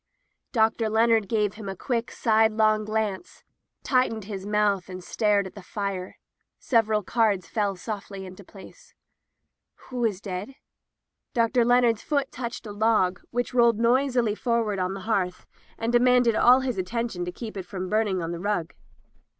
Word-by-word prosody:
Dr. 225 -1 +2
Leonard 220 -2 +3
gave 210 -3 +1
him 210 -2 -7
a 195 - -5
quick, 235 +3 -2
sidelong 215 -1 +2
glance, 215 -3 -3 0.4
tightened 255 -5 +1
his 195 -1 -6
mouth, 205 -3 +1
and 185 -1 -7
stared 205 0 +1
at 190 - -9
the 200 - -10
fire. 190 -1 -5 0.4
Several 220 -3 +1
cards 210 -4 +1
fell 205 -3 -1
softly 195 0 -6
into 185 +2 -11
place. 195 +1 -15 0.9
"Who 250 -1 -3
is 210 -5 0
dead?" 200 +5 -6 0.8
Dr. 235 +1 +3
Leonard's 240 -2 +3
foot 280 -2 -1
touched 240 -1 -6
a 210 - -6
log, 205 -4 +1
which 245 +1 -2
rolled 235 -3 +4
noisily 245 -1 +2
forward 225 -3 -1
on 185 +1 -1
the 195 - -7
hearth 185 -4 -1 0.3
and 230 +1 -2
de 240 - +6
manded 245 -2 +4
all 250 +3 +6
his 250 -6 -2
attention 225 -1 -3
to 180 - -4
keep 220 +4 -8
it 190 -2 -6
from 185 -1 -5
burning 210 -1 +1
the 170 -1 -3
rug. 180 -4 -2
215 Hz, 160 wpm, -25 LUFS, 195-235 Hz, 0.9 s, de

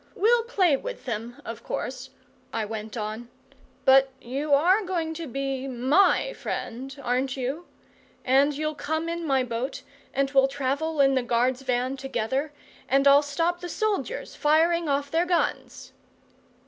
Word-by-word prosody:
"We'll 465 +4 +4
play 375 - +3
with - - -7
them, 235 0 -5
of 230 -1 -6
course," 255 +1 -5 0.4
I 225 -1 -2
went 220 +1 -6
on. 220 +2 -5 0.6
"But 270 0 +6
you 275 +5 -4
are 355 +9 +4
going 340 -4 -2
to 325 0 -6
be 270 +1 -3
MY 275 - +3
friend, 265 +4 -5
aren't 255 +2 0
you? 270 +7 -3 0.6
And 275 +3 +3
you'll 305 0 -1
come 315 +2 -3
in 335 -1 -3
my 270 -2 +2
boat, 245 +1 -4 0.3
and 275 0 0
we'll 270 -1 +5
travel 285 +3 -1
in 270 0 +5
the 260 - +2
guard's 245 +2 +1
van 255 +1 -1
together, 265 +2 -2 0.4
and 275 +1 +4
I'll 280 +1 +8
stop 330 +5 -1
the 355 - -6
soldiers 435 +5 -2
firing 325 +2 +2
off 280 0 0
their 335 +2 +1
guns!" 350 -1 -1
275 Hz, 150 wpm, -26 LUFS, 255-320 Hz, 0.6 s, I'll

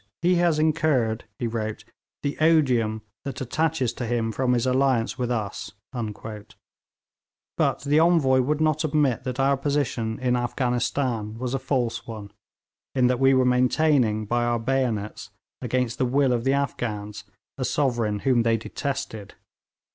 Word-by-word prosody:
'He 180 +1 +4
has 170 -3 +3
incurred,' 150 -8 +1
he 120 - -3
wrote, 110 -2 -3 0.4
'the 145 - -1
odium 125 -9 +3 0.2
that 135 -1 -5
attaches 135 -1 0
to 120 -1 -4
him 115 -1 0
from 125 +2 +1
his 120 0 +1
alliance 130 -1 +1
with 125 -1 -1
us'; 110 -4 -3 1.8
but - - +1
the 145 +2 +3
Envoy 160 -6 +4
would 145 +4 0
not 155 0 +1
admit 145 -5 +1
that 130 0 -4
our 135 +1 +3
position 135 -5 -1
in 125 -1 +1
Afghanistan 120 -2 -1
was 125 +1 -3
a 135 - 0
false 125 -2 -2
one, 105 -3 -8 0.6
in 130 -2 +3
that 125 0 +2
we 135 0 +5
were 130 -1 +3
maintaining 125 -3 +2
by 120 +3 0
our 120 0 +1
bayonets, 115 -5 -2 0.3
against 125 -1 -1
the 130 - +2
will 135 0 +2
of 120 0 -1
the 135 - +3
Afghans, 105 -7 -3 0.4
a - - -1
sovereign 120 -7 0
whom 125 -3 +3
they 115 0 +2
detested. 110 -3 -5
125 Hz, 150 wpm, -25 LUFS, 115-140 Hz, 1.8 s, we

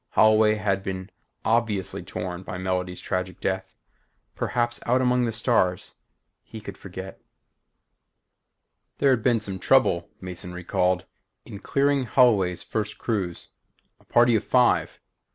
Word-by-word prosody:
Holloway 110 0 +5
had 100 -2 0
been 95 -1 -5 0.3
obviously 110 -6 0
torn 90 -1 -5
by 90 - -6
Melody's 90 -1 -2
tragic 90 0 -3
death. 95 0 -3 0.6
Perhaps 120 -1 -1
out 125 +2 +3
among 125 -1 +2
the 115 - -1
stars 105 -5 0 0.5
he 110 - -10
could 100 -2 -8
forget. 95 0 -9 1.8
There 140 -1 +4
had 125 -3 +2
been 120 -1 +2
some 95 -2 -5
trouble, 90 -11 +3
Mason 90 -1 -7
recalled, 90 0 0 0.4
in 100 - -9
clearing 140 +1 +1
Holloway's 105 -8 +3
first 105 -1 -3
cruise. 95 -7 -3 0.5
A - - -25
party 120 0 +4
of 110 - +1
five. 125 -1 +2
100 Hz, 130 wpm, -25 LUFS, 90-120 Hz, 1.8 s, Holloway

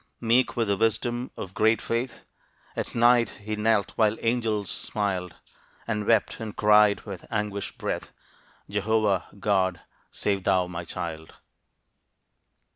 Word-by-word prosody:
Meek 120 +2 +2
with 115 -2 +1
the 100 - +2
wisdom 120 +3 0
of 95 - -6
great 110 +2 +3
faith, 115 +2 -3 0.5
At - - -4
night 120 0 +5
he 110 +1 -3
knelt 105 -1 +2
while 110 0 +3
angels 115 -5 0
smiled, 95 -4 -2 0.5
And 105 -2 -2
wept 110 -3 +2
and 110 -2 -6
cried 105 -1 +5
with 95 -5 -9
anguished 105 -2 -3
breath, - - -3 0.6
"Jehovah, 105 -2 +1
God, 95 -4 +1 0.3
save 100 -2 -1
thou 95 -2 +3
my 90 -1 -6
child." 80 -2 -6
105 Hz, 125 wpm, -26 LUFS, 95-115 Hz, 0.6 s, night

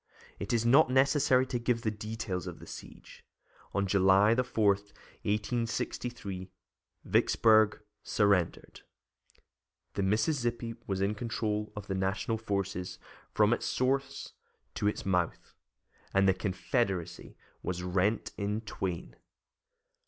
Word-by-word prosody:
It 100 - -4
is 115 -1 +1
not 135 +5 +6
necessary 130 0 +4
to 125 -2 -2
give 120 -1 0
the 110 - +1
details 105 -3 -4
of - - -6
the - - -12
siege. - - -11 0.5
On 100 0 0
July 95 +2 +5
4, 115 -3 +1
1863, 105 0 -4 0.6
Vicksburg 110 -2 +4 0.2
surrendered, 100 -5 +1 1.1
the 100 - -1
Mississippi 115 +3 0
was 95 -1 -1
in 100 +2 +1
control 105 -1 -2
of 105 -1 -6
the 100 - -3
National 95 +4 -1
forces 100 -4 -3 0.3
from - - +4
its - - -2
source 135 +1 -1 0.4
to 105 - -1
its 105 - -2
mouth, 90 -3 -1 0.6
and 95 0 +5
the 95 - +5
Confederacy 95 - -2 0.2
was 90 -1 -3
rent 95 +4 0
in 105 +2 -1
twain. 95 -5 -4
105 Hz, 115 wpm, -30 LUFS, 95-115 Hz, 1.1 s, not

